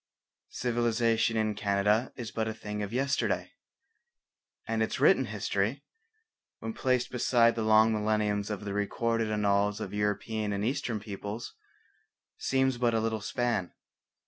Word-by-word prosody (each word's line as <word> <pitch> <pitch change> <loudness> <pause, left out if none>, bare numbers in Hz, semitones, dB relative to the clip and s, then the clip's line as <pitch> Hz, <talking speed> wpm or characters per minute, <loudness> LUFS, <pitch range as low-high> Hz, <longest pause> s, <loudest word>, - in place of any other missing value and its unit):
Civilization 115 -1 +1
in 110 -1 +1
Canada 105 +3 +1
is 120 -4 -6
but 110 -1 -1
a 110 - -3
thing 105 -1 -5
of 100 0 -4
yesterday, 135 +3 0 1.2
and 115 0 0
its 110 - -1
written 135 -1 +5
history, 105 +4 -1 0.7
when 225 - -5
placed 130 - 0
beside 120 -1 +3
the 115 - -3
long 110 +1 +5
millenniums 105 -1 0
of 105 -1 -4
the 100 - -3
recorded 115 +2 0
annals 105 0 +1
of 110 - -5
European 105 +1 -1
and 100 +1 -1
Eastern 125 -3 -1
peoples, 105 +2 -6 0.9
seems 130 -2 +1
but 120 -2 +2
a - - +3
little 110 -1 -1
span. 105 0 -1
110 Hz, 140 wpm, -29 LUFS, 105-120 Hz, 1.2 s, written